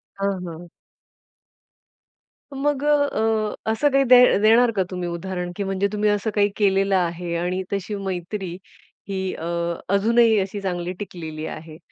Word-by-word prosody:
हां, 195 -1 -1
हां. 170 +1 -8 1.9
मग 285 0 -1
अ, 225 -8 +1 0.2
असं 290 +6 +2
काही 275 0 +4
दे 250 -1 +7 0.2
देणार 230 +2 +5
का 190 - +2
तुम्ही 180 -2 -4
उदाहरण? 180 +1 -4
की 200 - -3
म्हणजे 195 +1 0
तुम्ही 210 0 +1
असं 205 +1 0
काही 205 0 +3
केलेलं 195 -1 +2
आहे 170 -1 -1
आणि 180 +2 -2
तशी 200 +2 -3
मैत्री 190 -1 -4 0.6
ही 190 -1 -2
अ, 165 - -7 0.5
अजूनही 225 +2 +4
अशी 195 +1 -3
चांगली 180 -1 -3
टिकलेली 160 -5 -6
आहे. 155 0 -8
195 Hz, 140 wpm, -23 LUFS, 180-220 Hz, 1.9 s, दे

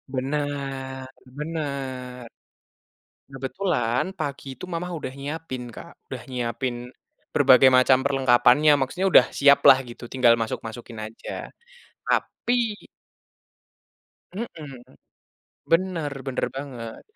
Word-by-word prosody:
Benar, 135 -1 -3 0.4
benar. 135 -5 -5 1.1
Kebetulan 135 -2 -1
pagi 140 -1 -4
itu 130 - -9
mama 170 +1 -3
udah 130 - -5
nyiapin, 140 -2 -5
Kak, - - -10 0.2
udah - - -7
nyiapin 120 0 -2 0.6
berbagai 130 +1 +7
macam 130 0 +5
perlengkapannya, 135 +2 +4
maksudnya, 175 +9 -1
udah 125 - +8
siap 140 0 +7
lah 130 - +9
gitu, 120 - -12
tinggal 125 -3 +5
masuk-masukin 115 +1 -6
aja, 110 - -12 0.8
tapi 245 - -1 1.8
Heeh. 180 -9 -6 1.0
Bener, 165 -3 +1 0.2
bener 130 - -1
banget. 125 -5 -7
135 Hz, 95 wpm, -24 LUFS, 125-150 Hz, 1.8 s, lah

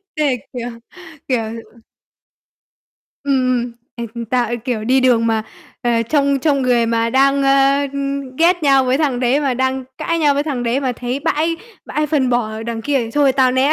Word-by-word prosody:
Thế 290 -4 +1 0.2
kiểu, 245 -1 -4 0.6
kiểu 250 -4 +1 1.8
Ừm, 280 - +1 0.3
ừm, 240 - -10 0.2
ê, 235 - -5 0.3
tao, 245 -2 +1
ê, 240 - -2
kiểu, 235 -2 -3
đi 260 +3 +3
đường 245 -3 +3
mà, 225 -1 +1 0.4
ờ, 235 -2 +2
trông 280 +3 +1
trông 280 -1 +1
người 245 -2 +2
mà 230 0 0
đang, 275 +2 +3
ơ, 275 +1 +4
ưm, 275 -2 -4
ghét 345 +2 +3
nhau 275 -2 +4
với 255 +1 +1
thằng 275 -6 0
đấy 255 +3 +2
mà 275 -3 0
đang 260 +1 -1
cãi 335 - -1
nhau 295 -3 +3
với 285 - +1
thằng 280 -5 -3
đấy 240 +3 0
mà 260 -2 -1
thấy 245 +3 -4
bãi 320 +3 0 0.3
bãi 300 0 -1
phân 280 -4 +1
bò 220 -3 -1
đằng 225 -1 -4
kia 285 +1 +1
thì 230 -2 -3
thôi 280 +1 +3
tao 260 -1 +3
né. 265 +3 +3
260 Hz, 190 wpm, -18 LUFS, 240-280 Hz, 1.8 s, ơ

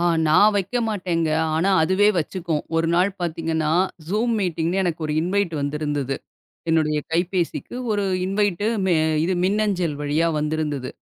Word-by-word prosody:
ஆ 175 - +1 0.2
நான் 205 +7 +6
வைக்க 195 +5 -1
மாட்டேங்க. 175 -6 -1 0.3
ஆனா 190 +5 +2
அதுவே 190 +5 +3
வச்சுக்கும். 165 -2 -2
ஒரு 165 0 +1
நாள் 185 +3 +3
பாத்தீங்கன்னா, 160 -2 -1 0.4
Zoom 220 +5 0
மீட்டிங்னு 175 0 0
எனக்கு 170 -2 -2
ஒரு 150 - -2
இன்வைட் 180 -1 0
வந்திருந்தது. 145 -2 -2 0.5
என்னுடைய 155 -2 +2
கைபேசிக்கு 175 +5 -1 0.2
ஒரு 205 -1 0 0.2
இன்வைட் 200 -1 0 0.6
இது 185 +2 +1
மெ - - 0
மின்னஞ்சல் 190 -6 0
வழியா 150 +3 +1
வந்திருந்தது. 150 -3 -2
170 Hz, 135 wpm, -22 LUFS, 155-195 Hz, 0.6 s, நான்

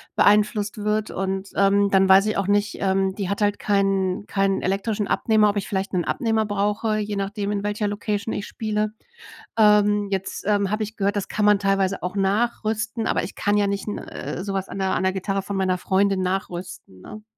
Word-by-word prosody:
beeinflusst 210 0 +3
wird. 210 +1 -1
Und, 195 0 -3
ähm, 200 0 +3
dann 190 0 +4
weiß 195 +2 +6
ich 215 - -1
auch 195 - -1
nicht 205 0 +1
ähm, 190 0 +1
die 195 -3 -3
hat 200 +2 -3
halt 205 0 +2
keinen 195 -1 0
keinen 195 -1 0
elektrischen 200 +2 -1
Abnehmer, 215 -2 +3
ob 205 - -2
ich 195 - -2
vielleicht 195 0 -3
'nen 175 -2 0
Abnehmer 225 -4 0
brauche, 205 +2 0
je 210 -1 -3
nachdem, 200 +1 -3
in 200 -1 -2
welcher 205 0 -1
Location 205 +1 -2
ich 200 - -4
spiele. 215 -1 -2 0.6
Ähm, 210 -1 +4
jetzt, 195 -1 -3
ähm, 200 -2 +1
habe 215 +1 0
ich 215 +1 -6
gehört, 200 0 0
das 200 - -2
kann 210 - -1
man 210 -1 +5
teilweise 195 -1 0
auch 180 +2 -4
nachrüsten, 215 +2 -1
aber - - +1
ich 175 - -6
kann 205 0 +1
ja 205 - +3
nicht 200 +1 -3
'n 210 - -3
äh, 180 - -6
sowas 195 -1 -3
an - - -7
'ner 190 -1 0
an - - -1
'ner 190 - +2
Gitarre 195 +1 -2
von 200 - -6
meiner 185 -1 +1
Freundin 195 +1 +1
nachrüsten, 180 - -5
ne? 215 - -10
200 Hz, 205 wpm, -23 LUFS, 195-210 Hz, 0.6 s, weiß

